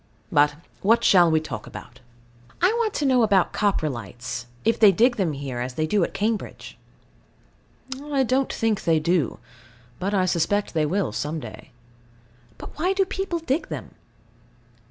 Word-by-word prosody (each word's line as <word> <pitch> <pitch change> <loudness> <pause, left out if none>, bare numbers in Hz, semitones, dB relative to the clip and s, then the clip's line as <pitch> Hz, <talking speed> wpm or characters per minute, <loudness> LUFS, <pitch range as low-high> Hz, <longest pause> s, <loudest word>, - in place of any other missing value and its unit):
But 150 -3 +3 0.3
what 230 +4 +3
shall 180 -6 +6
we 160 -1 +3
talk 125 -9 -7
about? 125 - -11 0.6
I 365 - +4
want 440 -3 0
to 295 - 0
know 260 -2 +4
about 200 -5 +3
Coprolites, 125 - -2 0.2
if 230 - +2
they 210 -3 +8
dig 240 +6 +3
them 180 -7 0
here, 135 -3 -5
as 125 +1 -4
they 155 - 0
do 195 +4 +1
at - - -2
Cambridge. 215 +1 -3 1.3
I 285 -2 0
don't 260 +2 +1
think 225 -3 -1
they 165 -2 +3
do. 165 -3 0 0.6
But 200 +3 -1
I 185 -1 +2
suspect 185 +4 0
they 155 -2 +1
will 185 - -1
some 150 +8 -3
day. - - -10 0.9
But - - -11
why 365 +4 +2
do 390 0 +2
people 380 -2 -3
dig 320 -1 -2
them? 155 -4 -6
190 Hz, 160 wpm, -24 LUFS, 150-240 Hz, 1.3 s, they